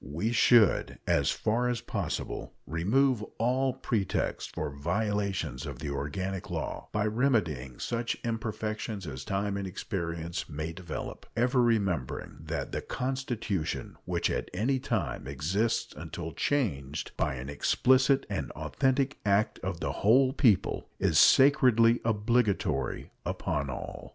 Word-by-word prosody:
We 85 - -2
should, 120 -2 +4
as - - +2
far 120 +3 +1
as 120 -2 -1
possible, - - -4
remove 110 - +2 0.2
all 130 +3 +2
pretext 115 -6 -2
for - - -2
violations 85 - -1
of 70 -4 -6
the 70 +2 -4
organic 95 +7 -3
law, - - -4
by 105 0 0
remedying 105 - 0
such 120 -1 -2
imperfections 110 -2 -3
as 65 -3 -6
time 100 +4 -1
and 100 -1 -3
experience 85 -3 -4
may 80 +2 -4
develop, 85 -2 -6
ever 125 +2 +3
remembering 100 - 0
that - - -4
"the - - -2
constitution 125 - -3
which - - 0
at - - -2
any 130 +8 +1
time 85 - -2
exists 85 - 0
until 80 +2 -6
changed 75 - -1
by - - 0
an 65 +1 -6
explicit 130 - +3
and - - -3
authentic 135 - 0
act 100 +1 +2
of 90 -2 -4
the 80 - -1
whole 130 +5 +5
people 115 -10 +2
is - - +3
sacredly 125 -4 +6
obligatory 110 - 0
upon 70 -1 -2
all." 65 - -6
105 Hz, 130 wpm, -29 LUFS, 80-120 Hz, 0.2 s, sacredly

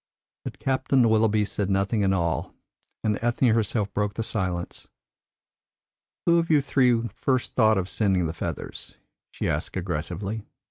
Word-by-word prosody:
But - - -7
Captain 130 -2 +2
Willoughby 110 -1 +3
said 100 -1 -2
nothing 100 +2 +1
at 95 - +3
all, 85 -3 -1 0.5
and 105 -1 0
Ethne 120 +1 +2
herself 110 -2 0
broke 105 0 -1
the 115 - -2
silence. 90 -5 -3 1.4
"Who 170 0 +5
of 165 - -2
you 155 -2 +5
three 125 -4 +2
first 130 -2 -1
thought 110 -3 +4
of 95 -1 -1
sending 95 -4 +1
the 80 - -2
feathers?" - - -6 0.3
she - - -3
asked - - -2
aggressively. 95 +5 -3
105 Hz, 145 wpm, -25 LUFS, 95-120 Hz, 1.4 s, Who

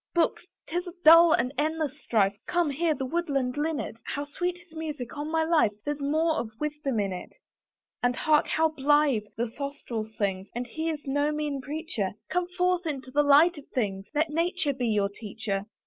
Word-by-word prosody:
Books! 340 - +1 0.2
'tis 355 +3 -3
a 350 - -7
dull 330 +1 +9
and 250 -2 +2
endless 310 -2 0
strife, 200 -3 +2
Come, 345 -4 +1
hear 315 +2 +1
the 265 -1 -3
woodland 275 -4 -1
linnet, 295 -5 -2
How 285 - -3
sweet 355 +5 -3
his 350 -2 -19
music; 300 -6 -5
on 295 +1 -4
my 320 0 +2
life 320 -10 +3
There's 295 0 -2
more 315 +3 +1
of 225 - -2
wisdom 295 -5 -2
in 195 -2 0
it. 180 - -8 0.7
And 245 0 +2
hark! 300 +2 +3
how 320 0 +2
blithe 290 -6 +2
the 230 0 -1
throstle 275 -5 -4
sings! 200 -3 -3
And 245 +1 -2
he 315 +7 -3
is 305 -2 -4
no 285 +2 +1
mean 300 -2 -2
preacher; 285 - -3 0.2
Come 360 -1 0
forth 360 -1 0
into 265 -4 -4
the 295 - +4
light 295 +3 +5
of 280 - -15
things, 195 -5 -2
Let 305 +1 +1
Nature 335 -2 0
be 250 -2 -2
your 210 -3 +2
teacher. 205 -1 -4
290 Hz, 190 wpm, -27 LUFS, 245-320 Hz, 0.7 s, dull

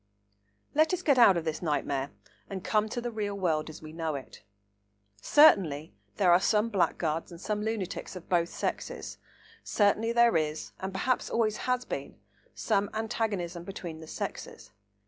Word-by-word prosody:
Let 315 +5 +3
us 365 - -8
get 280 -6 +4
out 200 -7 +7
of 165 - -3
this 160 -1 -2
nightmare 145 -4 -1 0.4
and 190 -2 -5
come 215 0 +1
to 240 - -3
the 240 0 -3
real 205 -2 -3
world 160 -5 0
as 155 - -11
we 155 0 -9
know 160 -2 -2
it. 135 - -9 0.8
Certainly 175 - +5 0.2
there 185 -4 +4
are 175 - +7
some 215 +3 +2
blackguards 170 -5 0
and 170 - -10
some 210 +2 -2
lunatics 210 -4 -3
of 180 - -9
both 175 -1 +2
sexes. - - -4 0.4
Certainly 215 +2 +2
there 235 -4 +5
is, 155 -1 -1
and 190 +1 -4
perhaps 250 +7 0
always 215 -2 +1
has 250 0 +1
been, - - -6 0.4
some 200 0 0
antagonism 205 -6 -2
between 175 -4 -7
the 160 - -11
sexes. - - -6
195 Hz, 165 wpm, -29 LUFS, 165-220 Hz, 0.8 s, out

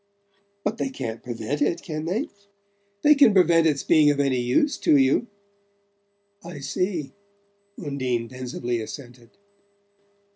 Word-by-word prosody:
"But 225 - -2
they - - -1
can't 115 - -6
prevent 125 +4 -4
it, 165 +4 0
can 155 -1 -5
they?" 225 - -2 0.7
"They 300 - +7
can 275 -8 +5
prevent 170 -3 +5
its 145 -3 0
being 155 -2 +5
of 145 -1 +1
any 135 -3 +1
use 125 - +1
to 150 - +4
you." 135 - +2 1.2
"I 170 -2 -9
see," 155 +2 -2 0.7
Undine 130 -7 -2
pensively 120 -1 -4
assented. 120 0 -10
145 Hz, 125 wpm, -24 LUFS, 125-175 Hz, 1.2 s, They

